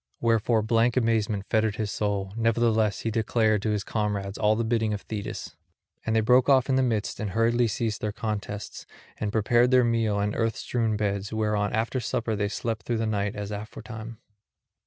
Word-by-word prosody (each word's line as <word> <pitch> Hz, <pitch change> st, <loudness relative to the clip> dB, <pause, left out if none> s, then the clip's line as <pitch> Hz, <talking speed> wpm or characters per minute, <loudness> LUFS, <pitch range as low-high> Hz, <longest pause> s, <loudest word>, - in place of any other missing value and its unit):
Wherefore 115 Hz, -1 st, +2 dB
blank 115 Hz, +2 st, +2 dB
amazement 110 Hz, -4 st, +1 dB
fettered 110 Hz, -2 st, +1 dB
his 110 Hz, -2 st, -2 dB
soul; 100 Hz, -2 st, -2 dB
nevertheless 115 Hz, -2 st, +2 dB
he 115 Hz, -, -2 dB
declared 110 Hz, -1 st, +1 dB
to 110 Hz, -, -1 dB
his 105 Hz, -2 st, 0 dB
comrades 100 Hz, -2 st, -2 dB
all 105 Hz, +1 st, +2 dB
the 115 Hz, -, 0 dB
bidding 110 Hz, -2 st, 0 dB
of 100 Hz, -, -7 dB
Thetis. 105 Hz, -2 st, -6 dB, 0.5 s
And 110 Hz, -, 0 dB
they 110 Hz, -, +4 dB
broke 125 Hz, +4 st, +4 dB
off 135 Hz, -1 st, +4 dB
in 130 Hz, -, +3 dB
the 130 Hz, -, +3 dB
midst 115 Hz, -5 st, -1 dB
and 105 Hz, -, -2 dB
hurriedly 115 Hz, +4 st, +2 dB
ceased 110 Hz, 0 st, -2 dB
their 105 Hz, -, -1 dB
contests, 105 Hz, -1 st, -5 dB, 0.3 s
and 105 Hz, -1 st, -1 dB
prepared 120 Hz, +3 st, +3 dB
their 130 Hz, -1 st, +5 dB
meal 115 Hz, -3 st, +1 dB
and 105 Hz, +1 st, -1 dB
earth 115 Hz, -1 st, 0 dB
strewn 115 Hz, -3 st, -1 dB
beds, 100 Hz, -1 st, -2 dB
whereon 105 Hz, -2 st, 0 dB
after 115 Hz, +4 st, 0 dB
supper 120 Hz, -2 st, -2 dB
they 105 Hz, 0 st, -1 dB
slept 110 Hz, 0 st, -4 dB
through 120 Hz, -, 0 dB
the 110 Hz, -, -1 dB
night 105 Hz, -1 st, -1 dB
as 105 Hz, 0 st, -5 dB
aforetime. 110 Hz, +2 st, -7 dB
110 Hz, 190 wpm, -26 LUFS, 105-115 Hz, 0.5 s, their